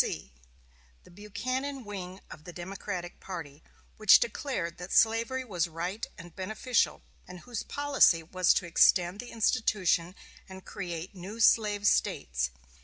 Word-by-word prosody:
3. 65 - -6 0.7
The - - -18
Buchanan 255 +7 -4
wing 190 -2 -7
of 150 - -11
the 175 - -9
Democratic 180 0 -6
party, 160 -6 -8 0.4
which 215 -2 +7
declared 200 -8 -3
that 180 +1 -7
slavery 230 +4 +2
was 180 -7 -1
right 175 +6 -4
and 170 0 -12
beneficial, 215 - 0 0.2
and 180 - -10
whose 245 -3 -5
policy 280 - +3
was 185 +2 +2
to - - 0
extend 175 +2 +4
the 245 - -7
institution, 195 -6 +1 0.3
and 190 0 -11
create 175 -2 -6
new 195 +4 -9
slave 210 -2 +3
States. 60 - +1
190 Hz, 135 wpm, -29 LUFS, 175-225 Hz, 0.7 s, which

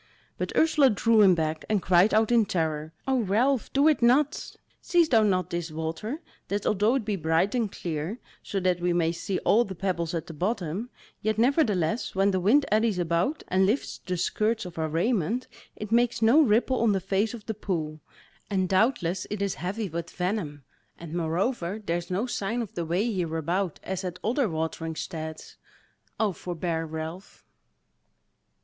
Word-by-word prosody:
But - - -2
Ursula 305 -4 +5
drew 225 0 +3
him 190 -3 +6
back, 155 -1 -2
and 215 -2 +2
cried 185 +2 +4
out 220 +1 +3
in 230 -3 +4
terror: 155 -3 -1 0.2
"O 265 -1 +2
Ralph, 235 +5 +1
do 280 +2 +4
it 310 -4 +3
not! 270 +5 +2 0.3
Seest 340 -4 +2
thou 225 -3 +6
not 185 -4 +1
this 170 -1 -3
water, 165 - -4 0.3
that 205 0 -2
although 210 +4 +2
it 255 -6 -1
be 210 -1 -1
bright 165 +3 +1
and 230 -5 0
clear, 165 +5 -4 0.2
so 195 - -3
that 180 -1 +1
we 175 0 +1
may 165 -1 +2
see 185 +2 -3
all 230 +4 +5
the 195 -4 -7
pebbles 175 -2 -2
at 165 -1 -3
the 165 - -9
bottom, 190 +4 -2 0.3
yet 215 0 0
nevertheless 225 - +1
when 195 +1 +3
the 185 - 0
wind 245 +11 +4
eddies 215 -2 +2
about, 175 - 0
and 190 +1 +3
lifts 230 +8 -1
the 180 -1 -4
skirts 215 +4 0
of 175 -2 -8
our 160 0 -1
raiment, 215 +7 0 0.3
it 210 0 -7
makes 240 0 +3
no 230 +8 +6
ripple 250 0 +2
on 225 -3 +3
the 195 - +1
face 195 +5 0
of 220 - -12
the 220 - -3
pool, 160 -7 -3 0.5
and 190 -2 +1
doubtless 190 -3 +1
it 210 - -3
is 200 -1 0
heavy 200 +5 -3
with 170 0 -5
venom; 180 -6 -3 0.3
and 165 -2 -9
moreover 175 +4 -1
there 170 -1 0
is 175 - -7
no 190 +6 0
sign 235 0 -2
of 215 - -10
the 170 - -3
way 175 +6 0
hereabout, 170 0 -1
as 190 0 -4
at 180 -1 -4
other 245 +1 +1
watering 160 0 -3
steads; 160 -1 -6 0.6
O 215 -2 +2
forbear, 170 -2 -3
Ralph!" 160 +4 -7
190 Hz, 180 wpm, -27 LUFS, 170-225 Hz, 0.6 s, him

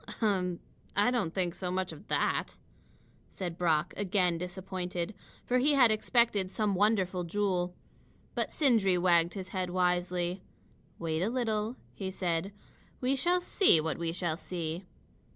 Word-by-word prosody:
"Um! 185 -5 +1 0.4
I 205 +5 +4
don't 220 -10 0
think 180 -1 -1
so 180 0 -4
much 185 0 -1
of - - -12
that," - - 0 0.7
said 175 -3 -5
Brock, 170 0 +1
again 180 -4 +1
disappointed, 180 0 -4 0.3
for 250 +1 +2
he 290 +4 +3
had 250 -5 +6
expected 215 -3 +2
some 210 +1 0
wonderful 190 -2 +2
jewel. 180 -1 -1 0.6
But - - -2
Sindri 225 - +3
wagged 175 0 +3
his 190 -2 -6
head 185 -2 -2
wisely. 180 0 0 0.6
"Wait 160 -1 -2
a 195 - +1
little," 225 -2 -1 0.2
he 190 -2 -4
said. 180 0 -2 0.5
"We 260 +2 +1
shall 350 +7 +2
see 355 - +5
what 160 +1 -2
we 165 -1 -1
shall 170 -2 -2
see." 170 0 -4
185 Hz, 145 wpm, -31 LUFS, 175-210 Hz, 0.7 s, had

